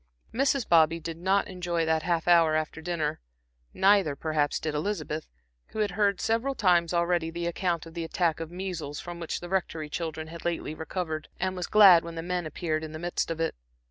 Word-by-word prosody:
Mrs. 270 0 +1
Bobby 165 0 +4
did 165 0 -6
not 190 +3 +1
enjoy 175 -3 -2
that 160 0 +1
half 170 0 -1
hour 165 -3 +5
after 155 0 -2
dinner; 160 -3 -2 0.5
neither, 190 -6 +3
perhaps, 150 -1 0
did 155 -1 -3
Elizabeth, 155 -1 -3 0.4
who - - -11
had 205 -2 0
heard 200 0 +1
several 230 +5 0
times 175 -6 +3
already 170 -1 +1
the 170 +1 -4
account 170 -1 -1
of 165 - -11
the 170 0 -4
attack 165 -1 0
of 165 -1 -5
measles 175 -5 -5
from 175 -1 -7
which 165 - -4
the 175 - -6
Rectory 170 -4 -2
children 160 -1 -4
had 165 +1 -10
lately 170 -2 -2
recovered, 160 -1 -4
and 185 0 -1
was 180 -1 -3
glad 195 -5 +8
when 170 0 -7
the 165 - -4
men 175 -1 -2
appeared 155 0 -2
in 155 0 -7
the - - -5
midst 175 +1 -2
of 165 -1 -3
it. 165 - 0
170 Hz, 205 wpm, -28 LUFS, 160-180 Hz, 0.5 s, glad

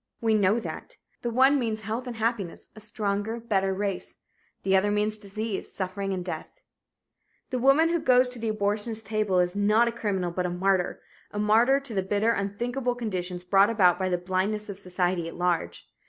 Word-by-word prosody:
We 225 -1 +2
know 205 0 +3
that. - - -8 0.2
The 240 - -2
one 265 +4 +4
means 220 -3 -2
health 225 +4 -4
and 245 - -5
happiness 220 -5 -2
a - - -10
stronger, 215 +1 -2
better 195 -4 0
race. 195 -1 -3 0.5
The 195 0 +3
other 190 +2 +3
means 210 +1 +1
disease, 210 0 -5
suffering, 190 0 -3
death. 175 - -7 0.9
The 255 - -1
woman 275 +6 +5
who 340 0 +1
goes 255 -2 +4
to 250 -1 -3
the 225 0 -2
abortionist's 215 +2 -1
table 210 -2 0
is 180 +1 +2
not 210 +3 +3
a - - +1
criminal 195 -6 -2
but 180 +1 -1
a - - -2
martyr 185 +1 0 0.3
a - - -8
martyr 225 +6 +4
to 275 -5 -6
the 195 - +1
bitter, 205 +4 +1
unthinkable 240 +5 -2
conditions 185 -6 -3
brought 195 +3 +4
about 185 -6 +4
by 185 0 0
the 180 - +1
blindness 190 +4 -2
of 195 -1 -6
society 180 -2 -1
at 165 - -8
large. 175 - -1
205 Hz, 185 wpm, -27 LUFS, 190-230 Hz, 0.9 s, woman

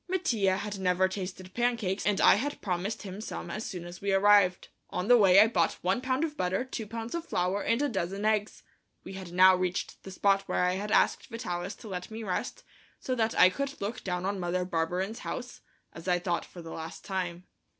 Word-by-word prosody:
Mattia 235 - +1
had 205 0 -5
never 185 0 +2
tasted 185 -1 -6
pancakes, 235 -6 0
and 205 -2 +2
I - - +7
had 280 +9 -2
promised 190 +3 -3
him 195 +1 -7
some - - -6
as 215 - -4
soon 180 -3 -6
as 175 +1 -10
we 200 0 0
arrived. 195 -2 +4 0.2
On 180 +2 -3
the 245 - +8
way 195 -4 +7
I 210 - +9
bought 180 -7 +1
one 190 +6 +1
pound 260 +3 0
of 310 -2 -2
butter, 190 0 -1
two 235 -4 -6
pounds 225 +2 -6
of 340 -1 -2
flour 185 +3 0
and 230 +1 +1
a - - +2
dozen 195 -3 -3
eggs. 215 -1 0 0.4
We - - -8
had 190 -2 -8
now 185 +1 +7
reached 180 -1 -3
the - - -10
spot 195 +1 +2
where - - +1
I 180 0 +2
had 200 +3 -3
asked - - +2
Vitalis 190 -5 -4
to 225 - -9
let 180 -3 -5
me 220 +1 -6
rest, 185 -4 -3 0.4
so 255 - -2
that 225 -2 0
I 185 - +7
could 280 +7 -4
look 205 +4 -4
down 180 -1 -2
on 200 0 -1
Mother 180 0 -1
Barberin's 180 +5 -2
house, 250 0 -6 0.3
as 165 +2 -10
I 180 -1 +3
thought 175 -1 -2
for 175 - -11
the 165 - -8
last 160 0 -8
time. 180 -3 -3
195 Hz, 220 wpm, -29 LUFS, 180-220 Hz, 0.4 s, I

